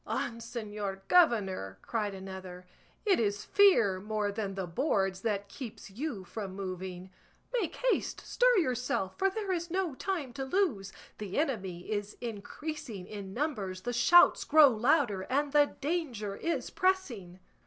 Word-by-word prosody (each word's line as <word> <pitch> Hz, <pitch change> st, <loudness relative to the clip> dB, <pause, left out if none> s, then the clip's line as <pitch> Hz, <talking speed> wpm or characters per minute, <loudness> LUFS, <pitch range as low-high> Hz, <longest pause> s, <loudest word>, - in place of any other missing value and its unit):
"On, 230 Hz, -1 st, -2 dB
señor 210 Hz, -4 st, -5 dB
governor!" 195 Hz, -, +3 dB
cried 210 Hz, -4 st, -2 dB
another, 190 Hz, -1 st, -8 dB, 0.4 s
"it 395 Hz, -3 st, +4 dB
is 205 Hz, -2 st, 0 dB
fear 235 Hz, -, +5 dB
more 210 Hz, 0 st, -1 dB
than 200 Hz, -2 st, -3 dB
the 190 Hz, -1 st, -2 dB
boards 190 Hz, -, 0 dB
that 205 Hz, -2 st, -1 dB
keeps 225 Hz, -2 st, -9 dB
you 235 Hz, -2 st, -4 dB
from 195 Hz, 0 st, -6 dB
moving; 185 Hz, -1 st, -6 dB, 0.4 s
make 450 Hz, -9 st, -1 dB
haste, -, -, 0 dB
stir -, -, +3 dB
yourself, 250 Hz, -, 0 dB
for 390 Hz, -, +4 dB
there 400 Hz, 0 st, -3 dB
is 345 Hz, -1 st, -2 dB
no 365 Hz, -3 st, -1 dB
time 305 Hz, -4 st, -3 dB
to 270 Hz, -, -4 dB
lose; 265 Hz, -, 0 dB, 0.3 s
the 205 Hz, -3 st, -5 dB
enemy 195 Hz, -, -1 dB
is 205 Hz, 0 st, -3 dB
increasing 240 Hz, -, -6 dB
in 200 Hz, -1 st, -7 dB
numbers, 205 Hz, -8 st, -3 dB
the 245 Hz, +3 st, -3 dB
shouts 240 Hz, +9 st, +6 dB
grow 300 Hz, -1 st, +7 dB
louder, 235 Hz, -3 st, +2 dB
and 285 Hz, +2 st, +1 dB
the 290 Hz, -1 st, +4 dB
danger 270 Hz, -, -2 dB
is 335 Hz, +10 st, -2 dB
pressing." 260 Hz, -, 0 dB
225 Hz, 145 wpm, -31 LUFS, 195-305 Hz, 0.4 s, grow